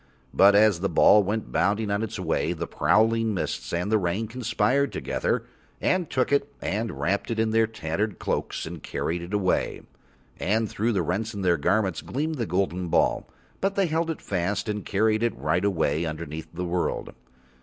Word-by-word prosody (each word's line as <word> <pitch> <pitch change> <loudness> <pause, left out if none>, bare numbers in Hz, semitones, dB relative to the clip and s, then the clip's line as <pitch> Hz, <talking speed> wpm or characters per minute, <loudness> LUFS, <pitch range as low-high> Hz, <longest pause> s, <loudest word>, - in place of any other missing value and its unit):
But 100 +1 +6
as 105 -4 +5
the 100 +2 0
ball 105 - +6
went 105 +2 -3
bounding 105 +1 +1
on 100 +1 0
its 110 - -4
way, 85 - 0
the 85 0 -4
prowling 115 +3 +2
mists 90 - -3
and 90 +5 -1
the 110 - +4
rain 95 +5 -1
conspired 125 +3 0
together - - -1 0.3
and 180 -3 +1
took 130 +1 0
it 140 0 +1
and 110 +3 -3
wrapped 100 +4 0
it 115 - -2
in 110 0 +1
their 115 0 +3
tattered 105 0 -3
cloaks - - -2
and 80 -1 -7
carried 85 +1 -3
it 85 +2 -8
away. 100 -3 0 0.6
And 110 +3 +1
through 115 +3 -1
the 95 -4 +1
rents 105 +7 -2
in 100 - -4
their 90 -2 +3
garments 95 +4 +1
gleamed 155 +2 -3
the 115 - -1
golden 90 0 -1
ball, - - +1 0.3
but 195 +1 0
they 195 - +3
held 165 0 0
it 160 - -4
fast 95 +3 -1
and 105 -1 -2
carried 110 +2 +1
it 120 0 0
right 75 +6 0
away 80 -7 +1
and 85 -1 -1
underneath 80 0 -6
the 90 +2 -4
world. 85 0 -2
105 Hz, 190 wpm, -26 LUFS, 90-115 Hz, 0.6 s, But